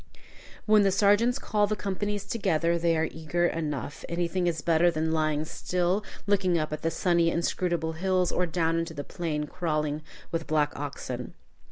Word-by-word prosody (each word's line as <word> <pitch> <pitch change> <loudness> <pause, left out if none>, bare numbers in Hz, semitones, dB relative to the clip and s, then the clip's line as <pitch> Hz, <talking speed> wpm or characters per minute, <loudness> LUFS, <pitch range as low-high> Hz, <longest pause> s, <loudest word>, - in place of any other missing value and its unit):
When 215 -1 +6
the 200 - +4
sergeants 205 +5 +4
call 210 -5 +1
the 215 - 0
companies 205 0 -3
together, 170 -6 +1
they 165 -1 +2
are 160 +1 +1
eager 165 +2 -1
enough. 150 -4 -3
Anything 175 +1 0
is 160 -3 -1
better 170 +1 +4
than 160 -1 -1
lying 155 -1 +1
still 180 +4 -1 0.2
looking 190 -4 +2
up 155 -1 -2
at 155 - -4
the 165 - +1
sunny, 170 -1 +2
inscrutable 170 -1 0
hills, 185 +1 +1
or 180 - +1
down 165 0 +1
into 165 -1 -4
the 145 - -4
plain 160 -4 -3
crawling 155 -3 -2 0.3
with 165 -1 -2
black 150 -1 +1
oxen. 130 -3 -5
170 Hz, 170 wpm, -28 LUFS, 155-185 Hz, 0.3 s, When